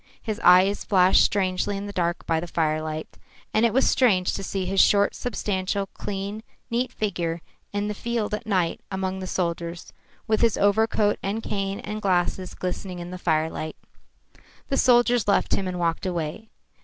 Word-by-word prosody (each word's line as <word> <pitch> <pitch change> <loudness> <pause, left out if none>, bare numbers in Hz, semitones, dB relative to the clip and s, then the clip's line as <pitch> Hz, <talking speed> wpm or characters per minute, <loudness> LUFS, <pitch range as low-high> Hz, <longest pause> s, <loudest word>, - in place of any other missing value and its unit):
His 220 0 -4
eyes 185 +3 +5
flashed 185 -2 +5
strangely 195 0 0
in 200 - -5
the 205 - -7
dark 175 -2 -1
by 165 -1 +1
the 175 - -5
firelight. 155 -1 -2 0.3
And 225 +2 +4
it - - -2
was 265 +4 +3
strange 200 -9 +3
to - - -3
see 195 -1 -3
his 190 +1 +3
short, 200 0 +4
substantial, 200 -4 -2
clean, 200 +2 -5 0.3
neat 245 +2 0
figure 175 -7 -2 0.3
in 205 0 -2
the 210 - -2
field 230 0 -2
at 215 +2 -4
night 185 -5 0
among 190 -1 -3
the 185 - -5
soldiers, 170 -1 -3 0.3
with 220 0 +1
his 230 -2 +3
overcoat 210 0 +2
and 210 +3 -3
cane 195 -1 -2
and 210 +1 -5
glasses 185 -1 0
glistening 180 0 -4
in 175 0 -7
the 180 - -7
firelight. 155 -1 -1 0.9
The 275 - 0
soldiers 240 -3 +4
left 200 - +2
him 195 - 0
and 180 -1 -3
walked 170 +2 -1
away. 175 +5 -4
195 Hz, 170 wpm, -25 LUFS, 180-210 Hz, 0.9 s, eyes